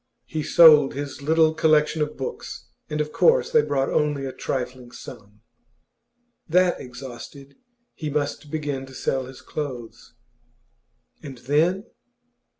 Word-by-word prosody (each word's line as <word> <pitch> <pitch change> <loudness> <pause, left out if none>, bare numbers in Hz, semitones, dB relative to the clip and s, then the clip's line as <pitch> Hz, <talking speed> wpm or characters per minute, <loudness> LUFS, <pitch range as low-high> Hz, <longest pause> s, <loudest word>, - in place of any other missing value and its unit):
He 155 - -4
sold 150 -3 +6
his 140 0 -6
little 160 +2 +3
collection 155 0 +2
of 150 0 -2
books, 135 - -6 0.2
and 150 - -3
of 150 0 -3
course 475 - +3
they 465 -1 +5
brought 135 - -1
only 145 -2 0
a 130 - -5
trifling 125 -2 -4
sum. 105 -2 -12 1.1
That 180 +1 +3
exhausted, 130 +2 -10 0.4
he 155 -3 -5
must 145 0 -3
begin 145 -3 -4
to 130 - -13
sell 130 0 -1
his 130 - -12
clothes. 120 -7 -7 1.1
And 140 -4 -9
then 160 - +1
145 Hz, 130 wpm, -24 LUFS, 130-155 Hz, 1.1 s, sold